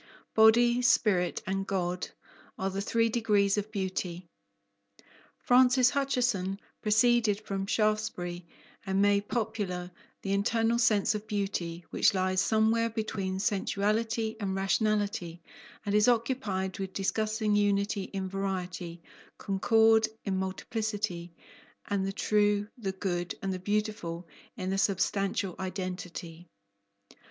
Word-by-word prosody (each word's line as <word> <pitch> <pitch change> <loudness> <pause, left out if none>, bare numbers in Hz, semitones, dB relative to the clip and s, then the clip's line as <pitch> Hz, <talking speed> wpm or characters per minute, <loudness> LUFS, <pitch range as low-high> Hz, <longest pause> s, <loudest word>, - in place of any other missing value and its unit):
Body, 235 +2 +5
spirit, 190 -7 +2
and 195 +1 -2
God 180 -2 -2 0.5
are 190 0 -2
the 195 +1 -3
three 230 +2 +2
degrees 210 -4 +2
of 210 +1 -3
beauty. 185 -3 -3 1.1
Francis 250 0 +5
Hutcheson 245 -9 0 0.2
proceeded 220 -1 +3
from 195 -2 -4
Shaftesbury 210 -5 -1 0.4
and 190 -2 -1
made 200 0 +3
popular 205 -6 -3 0.3
"the 195 - -1
internal 225 +3 +1
sense 215 -3 +3
of 210 0 -5
beauty, 185 -5 -3
which 205 - +3
lies 185 0 +1
somewhere 225 +1 +2
between 210 -4 -3
sensuality 220 +2 0
and 195 -2 -2
rationality 200 -3 0 0.5
and 205 - -1
is 210 +1 +4
occupied 230 -6 0
with 190 -1 -4
discussing 215 +2 0
unity 200 -1 +1
in 195 -1 -4
variety, 185 -3 -4 0.3
concord 220 +3 +3 0.2
in 195 -2 -1
multiplicity, 190 -2 -3 0.6
and 195 -1 0
the - - -1
true, 205 0 +1
the 205 -6 -3
good, 175 -2 -3
and 190 -1 -1
the 185 - -4
beautiful 205 -4 -2 0.3
in 185 0 -3
their 195 0 0
substantial 195 -1 0
identity." 180 -2 -6
200 Hz, 115 wpm, -29 LUFS, 190-220 Hz, 1.1 s, Body